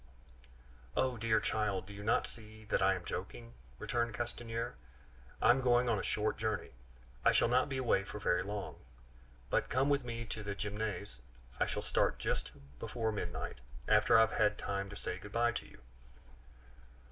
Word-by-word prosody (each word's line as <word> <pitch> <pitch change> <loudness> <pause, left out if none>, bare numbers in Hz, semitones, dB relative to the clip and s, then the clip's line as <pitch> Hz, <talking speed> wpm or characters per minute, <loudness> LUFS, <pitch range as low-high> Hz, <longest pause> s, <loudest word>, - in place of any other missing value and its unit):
"Oh! 130 -1 +2
dear 110 -1 +2
child, 100 -4 0
do 100 - -10
you 100 - -8
not 110 - +3
see 110 -1 -11
that - - +3
I 95 0 +5
am 90 -1 -7
joking?" 115 +6 -5 0.2
returned 120 - -1
Castanier. 120 0 -3 0.7
"I - - +7
am 130 +2 +3
going 125 -1 +4
on 115 -4 +2
a - - -3
short 110 0 0
journey; 110 -1 -1 0.5
I - - +6
shall - - +4
not 125 +4 +3
be 135 - -2
away 120 -6 +2
for 100 - -7
very 90 -4 +2
long. 100 0 -4 0.7
But - - +2
come 135 +3 +2
with 140 -2 +3
me 115 -1 -4
to 110 - -5
the 100 -1 -4
Gymnase; 100 - -4 0.4
I - - +3
shall - - -2
start - - +2
just - - -1 0.3
before 110 - -1
midnight, 85 -8 -4 0.3
after 105 +1 +6
I - - +8
have 110 - +4
had 105 -2 +3
time 100 0 -2
to 105 - -8
say 90 - -4
good 100 +2 -10
by 120 0 +3
to - - -5
you." - - -17
110 Hz, 180 wpm, -34 LUFS, 100-120 Hz, 0.7 s, I